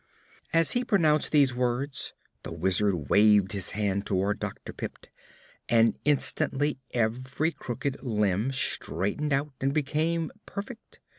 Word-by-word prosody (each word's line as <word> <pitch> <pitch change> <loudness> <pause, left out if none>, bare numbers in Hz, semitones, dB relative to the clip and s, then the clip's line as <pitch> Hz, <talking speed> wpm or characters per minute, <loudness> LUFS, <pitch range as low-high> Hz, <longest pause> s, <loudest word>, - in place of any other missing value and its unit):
As 165 0 +3
he 245 - +1
pronounced 160 -10 +2
these 140 -4 +4
words 125 +1 -2 0.3
the - - -7
Wizard 90 -2 0
waved 105 -1 +5
his 100 -3 -2
hand 100 -2 0
toward 100 +1 0
Dr. - - -6
Pipt - - -7 0.6
and 115 -1 +4
instantly 145 0 +1
every 130 +7 0
crooked 130 -1 -4
limb 105 -1 0
straightened 130 - -1
out 140 +1 0
and 135 +2 0
became 155 +3 0 0.2
perfect. 220 +3 -8
130 Hz, 125 wpm, -28 LUFS, 105-150 Hz, 0.6 s, waved